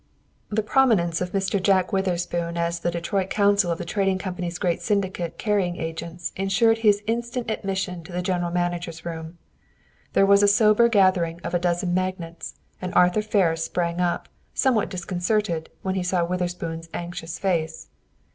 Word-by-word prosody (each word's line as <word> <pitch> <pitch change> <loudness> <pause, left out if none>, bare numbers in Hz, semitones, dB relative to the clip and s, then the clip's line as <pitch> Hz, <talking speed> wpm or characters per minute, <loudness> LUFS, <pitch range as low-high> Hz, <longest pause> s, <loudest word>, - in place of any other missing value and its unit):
The 215 0 0
prominence 205 -9 +3
of 180 0 -2
Mr. 195 0 0
John 190 -1 +4
Witherspoon 175 -3 -1
as 170 0 -1
the 175 - -1
Detroit 185 +3 -2
counsel 200 -3 +3
of 165 - -1
the 175 - -5
Trading 195 +1 +1
Company's 180 -2 -4
great 175 -2 0
syndicate 185 -4 -1
carrying 195 -5 0
agents 165 +1 -5
insured 195 +4 +2
his 210 -2 +3
instant 235 +1 -2
admission 190 -4 -3
to 185 - -11
the 180 +1 -2
general 180 -2 0
manager's 175 -1 -2
room. 165 0 -6 0.8
There 195 - +5
was 200 0 +6
a 205 - +5
sober 215 +2 +5
gathering 185 -6 +3
of - - -4
a 175 - +2
dozen 175 0 0
magnates, 180 -2 -3 0.3
and 185 -1 -4
Arthur 180 +4 +4
Ferris 185 -6 +1
sprang 170 0 -2
up, 175 -1 0 0.3
somewhat 240 -6 +2
disconcerted, 180 -1 -1
when 190 - -1
he 190 - -1
saw 180 -1 +1
Witherspoon's 170 -2 -3
anxious 170 -1 -5
face. 165 -4 -2
180 Hz, 160 wpm, -24 LUFS, 170-200 Hz, 0.8 s, was